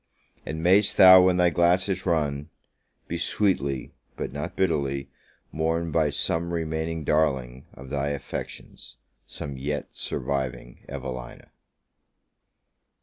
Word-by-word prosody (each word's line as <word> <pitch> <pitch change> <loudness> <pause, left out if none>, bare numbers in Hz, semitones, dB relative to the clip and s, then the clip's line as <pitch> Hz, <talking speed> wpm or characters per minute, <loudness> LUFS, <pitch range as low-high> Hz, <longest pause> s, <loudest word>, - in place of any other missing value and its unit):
And 80 +1 -4
mayest 95 +3 +4
thou, 95 0 +10
when 90 0 +3
thy 90 -1 +4
glass 85 +4 +3
is 95 -1 -3
run, 75 -3 0 0.6
be 85 - -3
sweetly, 75 -8 0 0.2
but - - -4
not 75 +1 -5
bitterly, 70 -7 -1 0.4
mourned 80 +1 -1
by 80 -2 +3
some 85 +4 -1
remaining 80 0 -3
darling 65 -5 0
of 65 +1 -11
thy 70 -1 -1
affections 70 -1 -7 0.3
some 70 -1 -7
yet 75 +1 -3
surviving 65 -2 -4
Evelina! 60 -1 -7
80 Hz, 115 wpm, -25 LUFS, 70-85 Hz, 0.6 s, thou